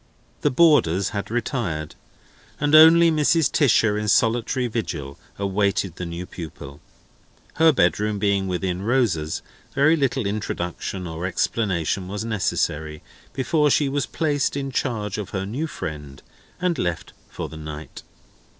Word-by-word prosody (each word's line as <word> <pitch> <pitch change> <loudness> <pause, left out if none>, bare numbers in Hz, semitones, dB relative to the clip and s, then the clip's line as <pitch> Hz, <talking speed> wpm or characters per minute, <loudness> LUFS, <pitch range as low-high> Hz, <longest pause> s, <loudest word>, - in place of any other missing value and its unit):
The 145 - +3
boarders 125 - +4
had 100 -2 -4
retired, 110 - -2 0.7
and 145 +1 0
only 165 +2 +8
Mrs. 155 -2 +2
Tisher 110 -7 +3
in 105 - -3
solitary 115 +4 +2
vigil 80 - -4 0.2
awaited 100 -2 0
the 90 - -4
new 85 +2 -5
pupil. 75 -5 -9 0.8
Her 160 +1 +6
bedroom 105 - +1
being 100 -1 +1
within 90 0 -2
Rosa's, 100 -10 0 0.3
very 145 +4 +4
little 135 -5 0
introduction 95 -2 -3
or 85 +1 -4
explanation 95 -2 -1
was 105 +3 -4
necessary, 80 -8 -2 0.3
before 145 +3 +1
she 145 0 +2
was 140 0 -1
placed 145 -3 0
in 135 -1 -3
charge 110 -6 -2
of 105 -1 -5
her 95 - -3
new 130 +11 -3
friend, 75 - -7 0.4
and 180 -2 0
left 85 -2 -3 0.2
for - - -5
the - - -11
night. 75 0 -8
105 Hz, 135 wpm, -23 LUFS, 90-135 Hz, 0.8 s, only